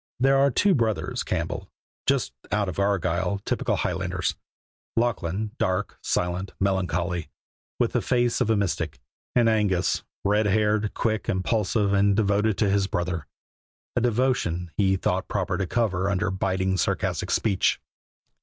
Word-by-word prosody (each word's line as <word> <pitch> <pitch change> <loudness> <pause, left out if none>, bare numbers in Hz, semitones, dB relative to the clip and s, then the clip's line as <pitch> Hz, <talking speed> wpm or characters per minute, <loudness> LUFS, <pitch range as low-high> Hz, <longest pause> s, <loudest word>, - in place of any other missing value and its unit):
There 135 +1 +4
were 140 +1 +5
two 195 - +3
brothers 115 - 0
Campbell - - -3 0.4
just - - +1 0.2
out 100 -3 0
from 100 - 0
Argyll, 95 -1 0
typical - - 0
Highlanders: - - -1 0.6
Lachlan, 105 -3 0
dark, 95 -6 -1
silent, 90 +2 -1
melancholy, 90 -3 0 0.5
with - - +1
the - - +1
face 120 0 +1
of 120 - +2
a 110 - +4
mystic, 85 -7 -1 0.4
and 120 -2 +5
Angus, 105 -5 +2 0.2
red 105 +1 +2
haired, 105 +1 +1
quick, 110 -2 -1
impulsive, 100 +1 +1
and 100 0 +4
devoted 105 0 +2
to 105 - +2
his 100 -1 +2
brother, 90 -5 -2 0.7
a 120 - +2
devotion 115 -8 0
he 95 -2 +3
thought 95 +1 -1
proper 95 -2 -1
to 95 0 -1
cover 100 -4 0
under 100 +1 0
biting, 95 0 0
sarcastic - - -1
speech. 100 -4 +2
100 Hz, 140 wpm, -25 LUFS, 95-110 Hz, 0.7 s, were